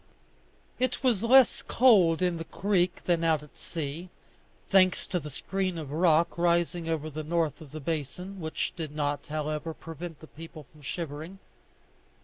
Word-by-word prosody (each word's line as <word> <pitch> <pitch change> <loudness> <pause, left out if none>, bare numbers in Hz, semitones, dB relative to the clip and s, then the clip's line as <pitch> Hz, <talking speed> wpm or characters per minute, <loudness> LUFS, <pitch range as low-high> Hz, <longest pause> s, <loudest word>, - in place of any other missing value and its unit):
It 255 +2 0
was 240 -7 +3
less 250 +1 +6
cold 185 -9 +4
in 180 -2 +1
the 165 - -4
creek 180 0 0
than 170 -2 +2
out 160 -2 +2
at 150 - -16
sea, 165 +2 -5 0.6
thanks 185 -2 +4
to 180 - -1
the 150 -1 -7
screen 185 +6 -2
of 150 -4 -6
rock 165 +1 +3
rising 170 -1 +1
over 155 -1 -1
the 155 0 -5
north 160 -1 -1
of 150 -4 -12
the 155 - -6
basin, 165 +6 -4
which 160 0 -2
did 155 -3 -6
not, 145 -1 -2
however, 155 +1 -3
prevent 165 0 -8
the - - -11
people 160 -1 -11
from 150 - -17
shivering. 160 +4 -5
165 Hz, 160 wpm, -28 LUFS, 155-180 Hz, 0.6 s, less